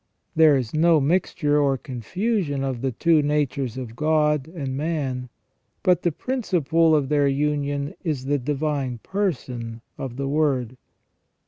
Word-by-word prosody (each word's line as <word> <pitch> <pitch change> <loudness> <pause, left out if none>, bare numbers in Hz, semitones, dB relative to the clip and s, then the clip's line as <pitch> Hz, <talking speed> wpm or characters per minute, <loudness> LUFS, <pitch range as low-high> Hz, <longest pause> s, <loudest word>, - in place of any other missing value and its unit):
There 155 -3 +6
is 120 -4 -3
no 165 +1 +4
mixture 150 -1 +1
or 135 -2 +2
confusion 145 - -2
of 130 -3 -3
the 135 0 0
two 160 +5 +3
natures 145 -4 -1
of 120 -3 -6
God 150 -1 +2
and 145 -6 -5
man; 135 -5 -2 0.5
but 180 -3 +3
the 175 - +1
principle 165 - +1
of 145 -3 +1
their 145 -1 +3
union 145 0 -1
is 150 -7 -2
the 145 +1 +1
divine 140 -2 -2
person 125 - -3 0.2
of 130 -3 -5
the 135 +1 -3
Word. 135 -5 0
145 Hz, 140 wpm, -24 LUFS, 130-160 Hz, 0.5 s, There